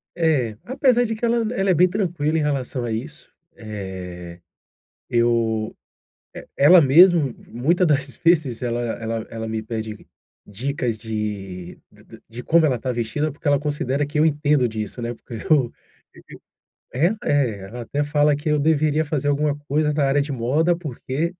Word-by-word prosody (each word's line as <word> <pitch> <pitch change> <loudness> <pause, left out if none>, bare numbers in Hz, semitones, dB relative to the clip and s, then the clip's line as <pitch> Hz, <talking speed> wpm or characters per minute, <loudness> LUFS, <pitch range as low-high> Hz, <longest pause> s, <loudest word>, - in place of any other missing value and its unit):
É, 140 -10 +1
apesar 255 -2 +2
de 225 -1 -2
que 220 - -14
ela 235 0 +2 0.2
ela 195 -4 0
é - - +5
bem 180 +2 +5
tranquila 175 -5 -1
em - - +1
relação 135 -4 -2
a 120 - -3
isso, 135 +8 -6 0.3
eh, 95 -5 -8 0.7
eu, 115 -2 +1 0.6
eh, - - -10
ela 170 +5 +7
mesmo, 155 -1 +5
muita 165 +10 +1
das 140 -3 0
vezes 155 -9 +2
ela 120 -1 -1
ela 115 -1 -4
ela 115 -1 -5
me 110 0 -3
pede 110 -1 -6 0.4
dicas 120 +2 -3
de 105 -5 -5
de - - -20
de - - -15
de 120 +2 -8
como 165 +3 +4
ela 135 -4 +2
está 130 +2 -3
vestida, 125 +6 -2
porque 145 +2 -7
ela 145 -1 +4
considera 145 -1 -1
que 145 +1 -2
eu 155 - +5
entendo 145 -4 +2
disso, 110 +1 -5
né. 120 0 -3
Porque 120 0 -11 0.2
eu 135 -6 +4 1.2
é 140 +8 +3 0.2
é, 130 -8 +1
ela 120 +4 -8
até 145 +5 -2
fala 145 0 +2
que 145 +2 -4
eu 150 0 +2
deveria 155 0 +2
fazer 145 -2 -2
alguma 145 0 +1
coisa 150 +1 +1
na 145 -1 +1
área 140 +1 +2
de 145 +1 -4
moda, 140 +8 +1
porque 155 +1 -4
140 Hz, 170 wpm, -22 LUFS, 115-155 Hz, 1.2 s, ela